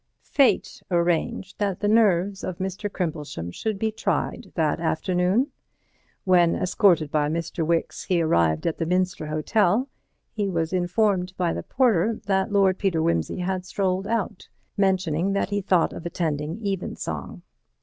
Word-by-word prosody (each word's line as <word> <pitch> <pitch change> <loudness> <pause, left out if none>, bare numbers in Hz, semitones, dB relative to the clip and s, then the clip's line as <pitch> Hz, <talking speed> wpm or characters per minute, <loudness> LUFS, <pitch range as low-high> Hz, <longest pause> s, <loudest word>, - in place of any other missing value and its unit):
Fate 275 -3 +2
arranged 175 +2 0
that 200 -3 -1
the 205 - 0
nerves 200 -3 +3
of 185 - -4
Mr. 190 +2 -4
Crimplesham 150 - -4
should 215 - -3
be 220 +2 0
tried 215 - -2
that - - +1
afternoon. 185 - +1 0.7
When, 175 -3 +4
escorted 175 -4 +2
by 150 -1 +1
Mr. 165 +1 -2
Wicks, 165 +1 -1
he 180 -2 +1
arrived 85 - +2
at 165 - -1
the 165 - -1
Minster 180 -3 0
Hotel, 195 - +1 0.5
he 205 -2 -1
was 165 -1 -1
informed 185 0 +1
by 175 -2 +1
the - - -3
porter 225 -4 +1
that 190 0 +1
Lord 195 -2 +3
Peter 190 -5 +1
Wimsey 85 - 0
had 185 0 -2
strolled 190 0 -1
out, 220 -5 -2 0.3
mentioning 190 -2 +1
that 200 0 -1
he 205 0 0
thought 185 -3 +2
of - - -8
attending 165 +3 -3
Evensong. 195 -2 -4
185 Hz, 150 wpm, -24 LUFS, 165-200 Hz, 0.7 s, When